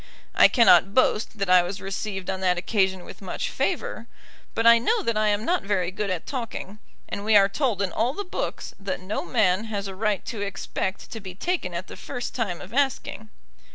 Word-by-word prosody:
I -, -, +7 dB
cannot 225 Hz, -5 st, +5 dB
boast 225 Hz, -4 st, +2 dB
that 195 Hz, -1 st, -1 dB
I 180 Hz, 0 st, +7 dB
was 185 Hz, +3 st, -4 dB
received 195 Hz, -1 st, -4 dB
on 190 Hz, -, -4 dB
that 180 Hz, -1 st, +2 dB
occasion 190 Hz, -1 st, 0 dB
with -, -, -11 dB
much 190 Hz, -, -4 dB
favour; -, -, -2 dB, 0.5 s
but 225 Hz, -, 0 dB
I 235 Hz, 0 st, +8 dB
know 445 Hz, -, +1 dB
that 230 Hz, -, 0 dB
I 215 Hz, 0 st, +2 dB
am 210 Hz, +1 st, +1 dB
not 360 Hz, +1 st, +1 dB
very 190 Hz, -3 st, 0 dB
good 200 Hz, +1 st, -3 dB
at 180 Hz, -3 st, -3 dB
talking, 230 Hz, -5 st, -5 dB, 0.3 s
and 200 Hz, -, -5 dB
we 215 Hz, 0 st, +3 dB
are 195 Hz, -1 st, +7 dB
told 205 Hz, -2 st, 0 dB
in 185 Hz, -, -1 dB
all 235 Hz, +8 st, 0 dB
the 405 Hz, -, -3 dB
books 365 Hz, -, -4 dB
that 195 Hz, -1 st, -3 dB
no 185 Hz, +3 st, -3 dB
man 210 Hz, -3 st, +2 dB
has 205 Hz, -3 st, -3 dB
a 195 Hz, -, -6 dB
right 210 Hz, 0 st, -1 dB
to 230 Hz, -3 st, -5 dB
expect 200 Hz, -1 st, -4 dB
to 225 Hz, -, -5 dB
be 190 Hz, -3 st, -9 dB
taken 265 Hz, -, -2 dB
at 170 Hz, +2 st, -3 dB
the -, -, -10 dB
first 245 Hz, -, -6 dB
time 205 Hz, -8 st, -2 dB
of 190 Hz, -, -11 dB
asking. 265 Hz, -5 st, -1 dB
205 Hz, 215 wpm, -25 LUFS, 190-230 Hz, 0.5 s, I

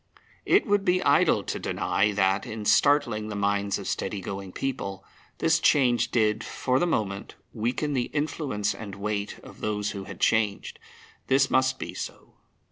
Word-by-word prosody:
It -, -, +4 dB
would 205 Hz, -2 st, +2 dB
be 185 Hz, -1 st, +2 dB
idle -, -, +4 dB
to -, -, -4 dB
deny 105 Hz, +1 st, 0 dB
that, 95 Hz, 0 st, +1 dB
in 110 Hz, -1 st, -6 dB
startling 120 Hz, -6 st, +3 dB
the 105 Hz, -, -5 dB
minds 100 Hz, 0 st, 0 dB
of -, -, -7 dB
steady 105 Hz, -, -2 dB
going 95 Hz, 0 st, -6 dB
people, 100 Hz, -6 st, -4 dB, 0.3 s
this 165 Hz, 0 st, +3 dB
change 125 Hz, -5 st, +3 dB
did, 110 Hz, -1 st, +1 dB
for 130 Hz, 0 st, 0 dB
the 175 Hz, -, +1 dB
moment, 100 Hz, -, -2 dB, 0.2 s
weaken 125 Hz, +7 st, -1 dB
the 125 Hz, -3 st, +1 dB
influence 145 Hz, -8 st, -1 dB
and 100 Hz, -3 st, -8 dB
weight 100 Hz, 0 st, -3 dB
of -, -, -13 dB
those 105 Hz, -1 st, -1 dB
who 100 Hz, -2 st, -6 dB
had -, -, -9 dB
changed. 110 Hz, -3 st, +1 dB, 0.5 s
This 135 Hz, 0 st, +3 dB
must 130 Hz, 0 st, +3 dB
be -, -, -6 dB
so. -, -, -8 dB
110 Hz, 165 wpm, -26 LUFS, 100-135 Hz, 0.5 s, It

